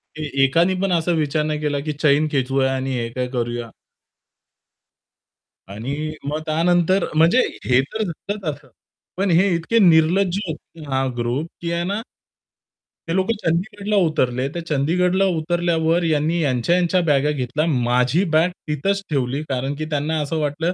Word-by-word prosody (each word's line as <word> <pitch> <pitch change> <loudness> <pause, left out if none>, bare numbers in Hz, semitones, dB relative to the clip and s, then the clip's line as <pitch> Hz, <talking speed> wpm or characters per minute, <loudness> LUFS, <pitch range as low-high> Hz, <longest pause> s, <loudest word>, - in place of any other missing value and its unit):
की 155 -1 -5
एकानी 170 +7 +3
पण 195 -1 0
असा 170 0 +1
विचार 150 +1 0
नाही 155 -1 -2
केला 145 -1 -1
की 150 - -1
चैन 150 +1 +2
खेचूया 135 -1 +1
आणि 130 0 -2
हे 115 0 -2
काय 125 -1 -2
करूया. 120 -1 -3 2.0
आणि 140 +9 -4 0.2
मग 155 +1 -2
त्यानंतर 175 +3 +2
म्हणजे 170 +11 +5 0.2
हे 130 +1 +4
तर 220 0 -1
झालंच 200 +5 -6
असं. 135 - -20 0.5
पण 195 -1 +1
हे 185 +4 +4
इतके 195 +8 +1
निर्लज्ज 180 +2 +4
होते 160 0 -8
हा, 135 0 +1
ग्रुप 120 +7 -1
की 170 0 -3
आहे 170 0 -1
ना 200 +4 -2 1.1
ते 165 - -1
लोक 190 +2 +1 0.2
चंदीगडला 200 +5 -1
उतरले. 130 -4 0
ते 170 - -2
चंदीगडला 175 +5 +1
उतरल्यावर 170 0 +1
ह्यांनी 160 +1 +1
ह्यांच्या-ह्यांच्या 170 +6 +2
बॅग 140 -2 +3
घेतल्या. 145 +3 -1
माझी 125 +3 +2
बॅग 165 +3 +4 0.2
तिथंच 195 +7 0
ठेवली. 135 0 -1
कारण 135 +2 -2
की 155 +1 -4
त्यांना 150 +2 0
असं 155 +2 -2
वाटलं 155 +4 -1
155 Hz, 150 wpm, -21 LUFS, 135-175 Hz, 2.0 s, म्हणजे